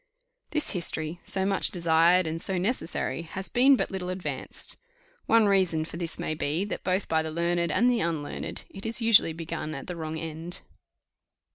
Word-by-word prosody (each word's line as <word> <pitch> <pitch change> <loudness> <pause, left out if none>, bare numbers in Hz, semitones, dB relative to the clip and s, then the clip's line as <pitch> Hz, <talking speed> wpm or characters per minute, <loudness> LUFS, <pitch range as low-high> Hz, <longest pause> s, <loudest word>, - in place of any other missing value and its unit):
This 305 -1 0
history, 170 -3 -3
so 190 0 -1
much 195 -1 +4
desired 170 +1 +4
and 160 +1 -3
so 190 0 -1
necessary, 180 -4 -2
has 190 +4 -5
been 265 +3 +5
but - - -2
little 185 -2 -4
advanced. 185 0 -3 0.5
One 225 -1 +5
reason 185 -6 +2
for 160 - -8
this 170 -2 -3
may - - -2
be, 155 +4 0
that 210 - -5
both 185 +1 0
by 160 0 +2
the 160 - -3
learned 170 +1 0
and 240 - +3
the 245 -2 +3
unlearned 160 -5 -2 0.3
it 195 +1 -10
is 230 - 0
usually 225 -7 +7
begun 160 -1 -5
at - - -6
the 180 - -5
wrong 160 -1 -4
end. 165 +3 -5
175 Hz, 180 wpm, -27 LUFS, 160-195 Hz, 0.5 s, usually